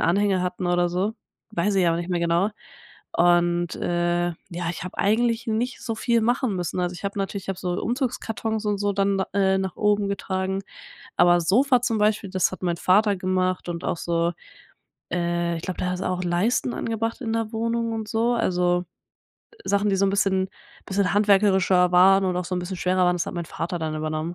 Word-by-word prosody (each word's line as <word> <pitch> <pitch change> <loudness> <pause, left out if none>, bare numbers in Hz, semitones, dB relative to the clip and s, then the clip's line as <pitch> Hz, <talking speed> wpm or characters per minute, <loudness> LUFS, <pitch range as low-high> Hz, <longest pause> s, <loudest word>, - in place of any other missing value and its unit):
Anhänger 195 +1 +2
hatten 180 0 -3
oder 175 0 +2
so, 190 +5 -1 0.4
weiß 200 +2 0
ich 185 -2 +3
aber 165 0 +2
nicht 175 +1 -4
mehr 175 - +1
genau. 170 +4 +1 0.6
Und, 175 0 +2
äh, 175 0 0 0.2
ja, 175 -1 -3
ich 170 - -6
habe 180 - -8
eigentlich 230 +3 +1
nicht 235 +4 -1
so 225 - -3
viel 235 0 +2
machen 240 -3 +1
müssen. 180 +1 -2
Also, 180 0 -1
ich 190 - -10
habe 200 +1 -3
natürlich 195 0 -4
ich - - -17
habe 190 - -5
so 180 -1 -2
Umzugskartons 225 -3 -2
und 205 -1 0
so 205 0 0
dann 195 0 +1
da 190 - 0
äh, 190 -1 +3
nach 190 -1 -3
oben 205 -1 +2
getragen. 190 0 -2 0.6
Aber 175 0 +5
Sofa 250 - +3
zum 230 -3 0
Beispiel, 210 -2 +1
das 185 -1 +1
hat 185 - -8
mein 175 -1 0
Vater 205 +3 +3
gemacht. 185 -1 -1
Und 170 0 -5
auch - - -1
so, 170 0 0 0.8
äh 170 -1 0
ich - - -7
glaube, 185 - -4
der 180 - -1
hat 180 - -3
auch 185 0 -2
Leisten 200 +8 0
angebracht 225 +2 -3
in 225 -3 -3
der 225 -1 -1
Wohnung 230 0 -1
und 220 -1 -4
so, 230 +2 +1
also 180 -5 +1 0.8
Sachen, 200 0 +1
die 195 - +2
so 195 +1 +3
'n - - +1
bisschen 190 -2 +1 0.4
bisschen 195 0 0
handwerklicher 190 -3 +4
waren 190 +2 +6
und 180 -1 0
auch 180 - -2
so 185 - -3
'n - - -1
bisschen 185 +1 -5
schwerer 185 0 +2
waren. 180 0 +2
Das 175 - -2
hat - - -5
mein 170 -1 -3
Vater 175 +1 -4
dann 155 -1 -3
übernommen. 155 +2 -3
190 Hz, 205 wpm, -24 LUFS, 175-210 Hz, 0.8 s, waren